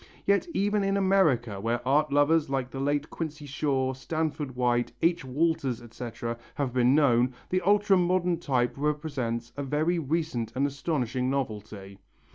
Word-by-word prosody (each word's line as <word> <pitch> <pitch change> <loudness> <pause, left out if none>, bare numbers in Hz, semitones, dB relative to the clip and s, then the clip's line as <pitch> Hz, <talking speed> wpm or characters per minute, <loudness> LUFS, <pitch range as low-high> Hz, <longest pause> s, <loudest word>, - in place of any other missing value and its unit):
Yet 200 - +2
even 205 +1 +1
in 195 0 +1
America, 150 - +2
where 120 +3 -2
art 150 +2 +3
lovers 145 +1 +3
like 135 -2 -2
the 135 - -6
late 145 +2 -1
Quincy 155 -2 -5
Shaw, 135 -2 0
Stanford 150 0 -3
White, 120 -1 +1
H. 170 -2 +2
Walters, 140 -2 0
etc., 115 0 -6 0.2
have 135 -4 -2
been 125 +1 +4
known, 125 -4 +3
the 185 0 +1
ultra 205 0 +4
modern 180 -1 +1
type 130 -7 0
represents 140 -6 -2
a 145 - -4
very 155 +5 0
recent 155 -6 -2
and 135 +2 +2
astonishing 135 -3 -1
novelty. 105 -7 -4
140 Hz, 150 wpm, -27 LUFS, 125-160 Hz, 0.2 s, been